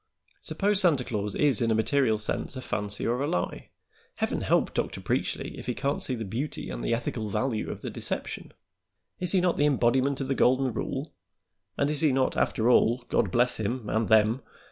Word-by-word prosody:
Suppose 205 0 +1
Santa 155 -9 +3
Claus 105 -3 -3
is 140 -7 +3
in 115 - +2
a 110 - +3
material 110 0 +2
sense 105 +5 -2
a 130 - -5
fancy 105 -3 -1
or 120 +3 0
a 145 - 0
lie; 90 - -3 0.5
Heaven - - -1
help - - +1
Dr. - - -2
Preachly - - -2
if - - -9
he 125 - -1
can't 140 0 -1
see 130 - 0
the 115 -2 -5
beauty 120 +10 -4
and - - -5
the - - -1
ethical 115 -2 -3
value 115 +1 -1
of - - -6
the - - -5
deception. - - -5 0.7
Is 180 0 +2
he 185 - +4
not 180 -1 +1
the 145 - +3
embodiment 135 0 +2
of 135 - -3
the 135 - +1
golden 130 -1 +2
rule, - - -4 0.6
and 140 +1 +1
is 150 - -1
he 155 -3 +4
not, 130 0 +1
after 110 - +1
all 120 0 +3
God - - +2
bless 125 0 +2
him 110 +2 -3
and 110 +1 0
them! 110 +3 +4
125 Hz, 205 wpm, -27 LUFS, 110-140 Hz, 0.7 s, he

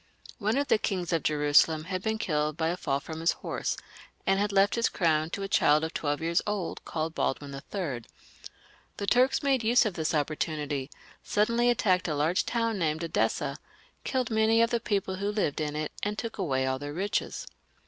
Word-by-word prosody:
One 215 +3 +1
of 285 0 +1
the - - +3
kings 180 -4 -2
of 165 - +2
Jerusalem 150 +1 +3
had 185 +2 -3
been 220 +2 -1
killed 150 -6 -1
by 160 -1 +1
a 175 - 0
fall 140 -6 -1
from 160 +2 -7
his 165 +1 +2
horse, - - -3 0.5
and 195 0 +3
had 205 0 +1
left 195 +1 +4
his 235 -1 +2
crown 160 -3 +1
to 200 +3 -4
a - - -2
child 155 -5 +4
of 160 - -3
twelve 145 0 -1
years 170 +1 +1
old, 205 -5 -3
called 160 0 -3
Baldwin 140 -2 -2
III. 140 -2 -4 1.0
The 200 - -3
Turks 255 +7 +3
made 270 -4 +2
use 235 +2 +4
of 210 - -1
the 165 - -4
opportimity, 150 -2 -1 0.3
suddenly 235 +3 +2
attacked 185 -6 +2
a 155 - -1
large 155 +5 +1
town 230 -3 0
named 160 -1 0
Edessa, 165 - 0 0.5
killed 255 -3 -1
many 220 +1 +3
of 230 - +1
the 235 - +2
people 195 -4 -1
who 200 +1 -1
lived 195 -8 -1
in 150 -1 -2
it, 155 0 -2
and 210 +1 -2
took 230 -2 -5
away 135 -8 0
all 130 0 -1
their 145 +1 -5
riches. 195 +5 -2
175 Hz, 200 wpm, -28 LUFS, 155-210 Hz, 1.0 s, left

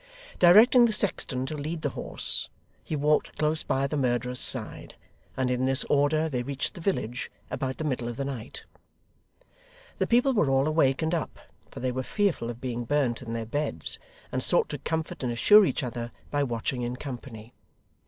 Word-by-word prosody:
Directing 220 +8 +7
the 225 - +2
sexton 150 -10 0
to 155 - -5
lead 155 +2 -5
the 145 - 0
horse, - - -2 0.3
he 155 - -4
walked 150 +1 +1
close 155 +1 +1
by 135 +1 0
the 140 - -3
murderer's 125 -2 0
side, - - +2 0.4
and 130 -1 0
in 125 +1 0
this 135 0 +4
order 145 +2 +2
they 130 -5 -2
reached 135 +2 -3
the 175 - -10
village 125 - -2 0.2
about 130 -1 -3
the - - -4
middle 130 -5 -2
of 120 0 -5
the 140 - -2
night. 130 -5 -6 1.3
The - - 0
people 245 +3 +3
were 185 - +2
all 135 +2 +2
awake 155 -2 +2
and 160 +2 0
up, 165 - -3 0.3
for - - -9
they 130 0 0
were 130 +1 -2
fearful 180 - -1
of 120 -1 -7
being 120 -2 -4
burnt 130 -2 0
in 115 -2 -6
their 115 -1 -3
beds, 145 +7 -3 0.3
and - - -1
sought 470 - +3
to - - -5
comfort 160 -1 -3
and 125 -2 -1
assure 205 - +6
each 160 - -1
other 120 -1 -5 0.2
by 145 - +1
watching 125 +1 -3
in 120 +1 -3
company. 120 -4 -8
135 Hz, 190 wpm, -27 LUFS, 125-155 Hz, 1.3 s, Directing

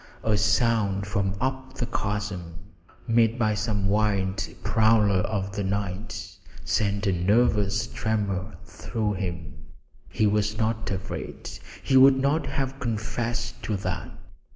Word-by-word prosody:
A 110 -1 +2
sound 105 -1 +2
from 100 -1 -1
up 130 0 -3
the 120 - -2
chasm, 100 -7 -3 0.5
made 115 0 +3
by 110 -3 +2
some 105 -1 -1
wild 100 -2 +1 0.2
prowler 110 -3 +4
of 100 0 -1
the 100 +1 -3
night, 95 -1 -4 0.3
sent 100 -1 0
a 100 - +3
nervous 105 +3 +2
tremor 105 -4 -2
through 105 +2 -3
him. 85 -7 -4 0.6
He 110 - +1
was 105 0 +1
not 110 0 -1
afraid; 95 0 -5 0.3
he 135 - +4
would 135 0 +8
not 140 +4 +1
have 135 -2 -2
confessed 115 0 -3
to 105 - -2
that. 95 - -4
105 Hz, 130 wpm, -26 LUFS, 100-115 Hz, 0.6 s, would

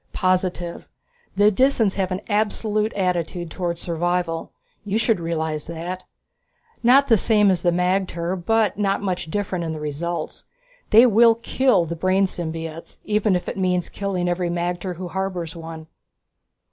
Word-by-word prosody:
"Positive. 180 -2 -1 0.5
The 205 +1 +5
Disans 230 -3 +2
have 190 -1 0
an 185 +2 -2
absolute 215 0 0
attitude 175 -2 -2
towards 170 -1 -3
survival; 175 0 -1 0.3
you 205 +1 -1
should 225 -3 +2
realize 160 -2 -3
that. 170 +3 -5 0.8
Not 265 +4 +5
the 225 - +5
same 210 -1 +3
as 180 - 0
the 175 - +3
magter, 180 0 0
but 210 +2 +1
not 200 0 0
much 180 -4 -2
different 185 -1 -2
in 160 -1 -3
the 155 - -6
results. 150 +3 -4 0.4
They 225 +3 +8
will 230 0 +6
kill 230 -4 +2
the 170 +1 -4
brain 185 +3 +2
symbiotes, 165 -2 -5
even 210 -2 +2
if 180 - -3
it - - -4
means 180 -2 0
killing 190 -3 -2
every 175 0 0
magter 175 +1 -2
who 180 +1 -6
harbors 185 -3 -3
one." 160 -1 -8
185 Hz, 150 wpm, -22 LUFS, 170-205 Hz, 0.8 s, They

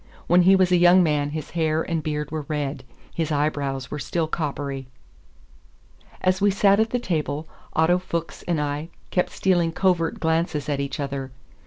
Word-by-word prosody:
When 175 +1 +5
he 190 +2 +6
was 185 -1 +3
a 180 - +5
young 175 +1 +6
man 150 -3 +1
his 155 0 -6
hair 160 -1 +1
and 165 -2 -2
beard 150 -1 -3
were 155 -1 -3
red; 145 -3 -3 0.3
his 165 -2 -2
eyebrows 145 -3 -1
were 150 - -4
still 165 +2 -1
coppery. 140 -4 -3 1.3
As 185 +1 +1
we 205 - +5
sat 200 +1 +4
at 220 +1 +2
the 245 - 0
table 155 -8 -2 0.3
Otto 170 +3 +3
Fuchs 170 -2 -4
and 170 -3 +1
I 150 +2 -3 0.2
kept 180 - +1
stealing 175 -3 +1
covert 175 -2 +1
glances 160 -2 0
at 145 -1 0
each 140 +2 -3
other. 140 -1 -3
160 Hz, 175 wpm, -24 LUFS, 145-175 Hz, 1.3 s, he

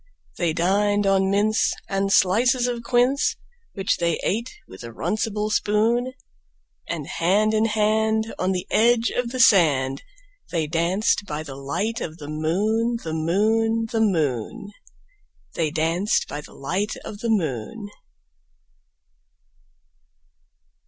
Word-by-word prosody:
They 170 -3 +1
dined 205 +5 +1
on 195 -1 +3
mince 210 +2 +2
and 195 0 -1
slices 240 +7 +3
of 240 -1 -2
quince, 245 +3 +2 0.4
Which 195 -1 0
they 170 -2 0
ate 230 +5 -1 0.2
with 95 - -12
a 115 - -7
runcible 210 - -2
spoon; 230 +5 +1 0.8
And - - -3
hand 205 +6 +1
in 220 0 +2
hand, 220 0 +1
on 185 +1 +1
the 180 -1 -2
edge 235 +1 +3
of 245 -1 -2
the 255 +1 -5
sand, 140 - +4 0.5
They 165 -3 -1
danced 175 +6 0
by 150 -2 -4
the 145 -3 -8
light 160 +12 -3
of 160 -1 -5
the 145 - -9
moon, 210 +10 0
The 160 - -4
moon, 220 +7 +1
The 225 -1 0
moon, 160 - -1 0.8
They 160 -2 0
danced 165 +6 0
by 145 - -5
the - - -15
light 190 +9 -2
of 205 - -8
the 230 - -3
moon. 200 - -2
200 Hz, 130 wpm, -23 LUFS, 165-225 Hz, 0.8 s, sand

